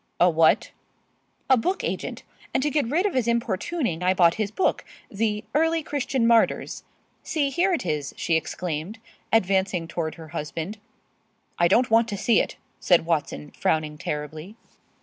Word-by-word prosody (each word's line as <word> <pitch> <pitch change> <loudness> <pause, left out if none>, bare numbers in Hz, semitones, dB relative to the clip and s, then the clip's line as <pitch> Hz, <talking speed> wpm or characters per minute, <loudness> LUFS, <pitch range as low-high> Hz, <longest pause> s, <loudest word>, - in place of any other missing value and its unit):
"A 175 0 +5
what?" 160 0 +3 0.8
"A 260 - +6
book 360 +11 -1
agent; - - -4 0.3
and - - +2
to 295 - 0
get 285 -4 +1
rid 330 - +1
of 410 - 0
his 255 -3 0
importuning 235 - -1
I 185 +1 +2
bought 170 -2 +5
his 210 - 0
book, 365 - 0 0.3
the 210 +1 -1
'Early 325 +2 +2
Christian 265 -4 -1
Martyrs.' 230 -1 +2 0.4
See, 295 -3 -1
here 360 +6 +2
it 340 - -1
is," 150 -4 -2
she 165 - 0
exclaimed, 160 +4 -3 0.3
advancing 190 -4 +1
toward 165 -2 -3
her 160 -2 -11
husband. 165 +5 -5 0.8
"I 175 - +5
don't 235 +7 +3
want 225 +1 +5
to 205 -3 -4
see 215 +2 +3
it," - - -2 0.2
said 175 -3 +3
Watson, 150 -3 -2
frowning 155 -5 -1
terribly. 155 +5 -5
195 Hz, 160 wpm, -25 LUFS, 165-250 Hz, 0.8 s, A